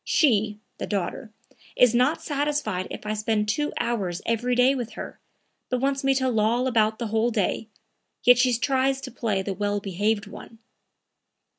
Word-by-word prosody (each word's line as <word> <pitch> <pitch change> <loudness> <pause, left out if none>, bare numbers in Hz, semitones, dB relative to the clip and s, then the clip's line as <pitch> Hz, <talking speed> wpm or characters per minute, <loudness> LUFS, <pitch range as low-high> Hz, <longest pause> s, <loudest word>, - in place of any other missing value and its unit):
She 215 - +2 0.2
(the - - -4
daughter) 205 +2 -3 0.4
is 250 -2 +5
not 280 +7 +2
satisfied 285 -10 -1
if - - -8
I 210 - -1
spend 215 0 0
two 295 +8 0
hours 195 -7 -1
every 240 +2 0
day 250 +2 +5
with 240 -4 -4
her, - - -8 0.5
but 250 - 0
wants 275 +1 0
me 270 0 +3
to 260 0 +1
loll 235 +1 +1
about 220 -3 +2
the 235 -3 -4
whole 225 +2 +1
day; 215 0 -1 0.6
yet 245 0 +6
she 250 0 +4
tries 265 +2 +1
to - - -7
play 220 -5 -1
the 195 - -3
well 205 +1 -1
behaved 205 +2 -1
one." 225 - -11
230 Hz, 170 wpm, -25 LUFS, 210-260 Hz, 0.6 s, yet